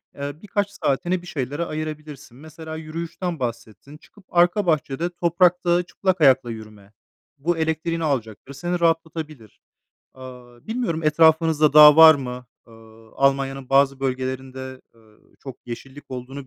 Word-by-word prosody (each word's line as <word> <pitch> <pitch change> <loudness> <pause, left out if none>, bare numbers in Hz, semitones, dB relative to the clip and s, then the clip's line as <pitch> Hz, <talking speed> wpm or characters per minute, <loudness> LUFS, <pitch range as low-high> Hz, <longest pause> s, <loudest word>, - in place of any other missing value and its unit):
eee, 140 0 -5
birkaç 205 -1 -2
saatini 175 +5 -1
bir 180 - -14
şeylere 145 +2 -4
ayırabilirsin. 155 -5 -7
Mesela 160 +1 -10
yürüyüşten 165 +2 -6
bahsettin: 120 +3 -7
Çıkıp 200 +4 -22
arka 175 +4 +2
bahçede 155 0 -1
toprakta 175 0 +1
çıplak 185 -1 -2
ayakla 130 -4 +4
yürüme. 110 -2 -12 0.4
Bu 165 +4 -1
elektriğini 160 +1 -2
alacaktır, 130 -3 -3
seni 175 +5 -3
rahatlatabilir. 160 -7 -3 0.6
Aaa, 125 -2 -13
bilmiyorum 220 -8 -3
etrafınızda 160 -1 +3
dağ 150 0 +9
var 160 -1 +9
mı? 125 -3 -7 0.2
Aaa, 115 -1 -18
Almanya'nın 135 -1 0
bazı 135 0 +2
bölgelerinde, 130 0 -5
ııı, 110 -2 -25 0.2
çok 135 -3 -9
yeşillik 135 +4 -10
olduğunu 130 +2 -8
145 Hz, 130 wpm, -22 LUFS, 130-165 Hz, 0.6 s, dağ